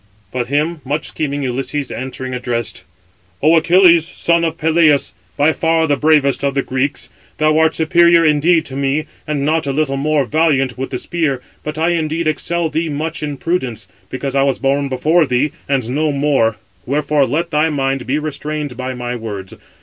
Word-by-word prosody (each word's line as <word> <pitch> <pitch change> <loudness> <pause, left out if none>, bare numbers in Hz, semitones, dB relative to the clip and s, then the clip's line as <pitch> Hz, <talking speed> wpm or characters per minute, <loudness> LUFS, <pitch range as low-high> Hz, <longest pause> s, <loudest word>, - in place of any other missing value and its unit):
But 125 -1 -2
him 150 +4 -1
much 145 +3 -3
scheming 145 -2 -3
Ulysses 135 +2 -3
answering, 130 0 -5
addressed: 120 -2 -3 0.6
"O 160 +2 +5
Achilles, 170 0 +5
son 170 -1 +1
of 165 0 -1
Peleus, 155 -3 +3 0.2
by 150 +2 +3
far 165 0 +1
the 145 -2 +2
bravest 145 -2 +2
of 140 -1 0
the 135 - +1
Greeks, 135 +2 -2 0.3
thou 155 0 +3
art 160 0 +3
superior 170 +1 +4
indeed 160 +2 +3
to 135 - -7
me, 140 +3 0 0.2
and 145 -2 -1
not 155 0 +1
a - - 0
little 135 -1 0
more 145 0 +1
valiant 140 -3 +1
with 135 +1 -4
the 130 - -3
spear, 155 -3 -1 0.2
but 150 0 -5
I 165 +2 +1
indeed 165 -1 -1
excel 170 +2 0
thee 160 +1 -2
much 155 +2 -3
in 145 -2 -4
prudence; 130 - -2 0.2
because 135 +1 -4
I 135 - +2
was 135 -1 +1
born 140 +1 0
before 155 +5 +2
thee, 135 +3 +1 0.2
and 135 -5 0
know 150 +3 +1
more: 140 -6 +1 0.3
wherefore 145 0 +1
let 165 +6 -2
thy 155 +1 +2
mind 135 -3 -1
be 135 +3 +1
restrained 150 -2 -4
by 130 +1 -4
my 125 0 -4
words. 105 -5 -6
145 Hz, 180 wpm, -17 LUFS, 135-160 Hz, 0.6 s, O